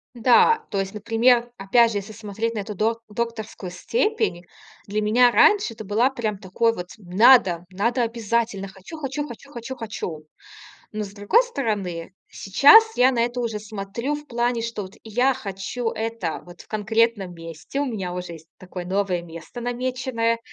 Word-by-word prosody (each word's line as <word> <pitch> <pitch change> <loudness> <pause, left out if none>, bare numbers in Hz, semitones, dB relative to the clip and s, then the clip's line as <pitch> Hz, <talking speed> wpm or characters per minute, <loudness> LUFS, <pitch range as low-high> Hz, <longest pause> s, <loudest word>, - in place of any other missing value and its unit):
Да, 350 - +4
то 200 - -1
есть, 195 +1 -5
например, 235 +3 +2
опять 230 +4 +4
же, 205 - 0
если 200 +2 -10
смотреть 220 +1 -4
на 215 - -3
эту 205 +1 -5
док 225 +3 0
докторскую 220 -4 -5
степень, 300 - -1 0.4
для 210 +1 -2
меня 240 +3 +4
раньше 405 - +4
это 220 -1 -9
была 220 +6 +2
прям 220 -6 -3
такой 215 +4 0
вот: 180 0 -6
"Надо, 190 -2 +4
надо 235 +6 0
обязательно! 230 -3 -1
Хочу 190 - -11
хочу 290 0 -3
хочу 280 +1 -11
хочу 240 +1 -7
хочу!" 180 -9 -6 0.7
Но, 215 0 -3
с 195 - -8
другой 210 - +3
стороны, 200 - -3 0.2
сейчас 445 - +6
я 255 +1 +5
на 240 - -1
это 240 +1 0
уже 225 -3 -2
смотрю 215 +6 -4
в 295 - -9
плане, 240 -2 -1
что 230 -2 -4
вот 185 - -11
я 245 +4 +1
хочу 200 +4 -4
это 225 -7 -3
вот 175 0 -12
в - - -20
конкретном 215 -3 0
месте. 165 - -7
У 285 - +1
меня 200 -8 -4
уже 180 -1 -5
есть 160 0 -13
такое 180 -1 -8
новое 185 -1 0
место 170 +8 -9
намеченное 245 -1 -1
225 Hz, 170 wpm, -23 LUFS, 195-245 Hz, 0.7 s, сейчас